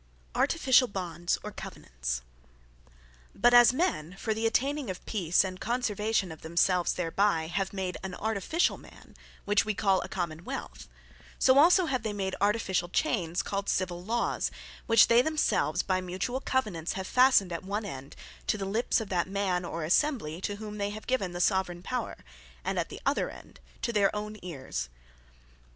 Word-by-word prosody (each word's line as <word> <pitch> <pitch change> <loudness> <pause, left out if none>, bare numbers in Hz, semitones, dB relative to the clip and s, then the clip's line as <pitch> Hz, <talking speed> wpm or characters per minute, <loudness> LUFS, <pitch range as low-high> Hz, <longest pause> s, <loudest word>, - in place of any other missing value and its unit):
Artificiall 260 -7 +3
Bonds, 175 -2 -2
Or - - -5
Covenants - - -5 1.1
But 240 +4 +4
as 240 -1 +8
men, 255 - -1
for 220 +2 -1
the 225 +1 0
atteyning 275 +2 0
of 185 - -6
peace, 180 -5 +2
and 185 -1 -5
conservation 220 -5 0
of 160 - -10
themselves 170 +2 +2
thereby, 175 -1 +1
have 190 +4 -2
made 190 -2 -3
an 190 -1 -6
Artificiall 220 - 0
Man, - - -16 0.3
which 205 +1 +3
we 215 0 -2
call 195 -2 +2
a - - -5
Common 170 -3 -4
wealth; - - -6 0.5
so 265 +1 +5
also 355 +4 +6
have 260 -6 -1
they 220 -1 -3
made 190 -2 -2
Artificiall 195 -4 +1
Chains, 185 - 0
called 200 0 -3
Civill 175 -2 -1
Lawes, 230 +4 0 0.4
which 230 -2 +7
they 235 +1 +6
themselves, 250 - +1
by 185 -1 0
mutuall 185 +9 -3
covenants, 205 -11 -1
have 190 - -4
fastned 250 -6 +4
at 170 - -3
one 205 +3 -3
end, 135 -7 -8 0.3
to - - +1
the 195 - -3
lips 220 +4 +1
of 215 - -6
that 175 -2 0
Man, 190 -2 -1
or 165 -1 -4
Assembly, 175 - +1
to 205 - -2
whom 210 0 -7
they 200 0 0
have 215 +1 -8
given 200 -9 -1
the 175 - -5
Soveraigne 180 -1 +1
Power; 250 +1 -3 0.5
and - - 0
at - - -2
the - - -9
other - - +1
end - - -13 0.2
to 235 - -1
their 200 -2 +4
own 210 +1 -4
Ears. 130 - -5
195 Hz, 170 wpm, -29 LUFS, 175-230 Hz, 1.1 s, as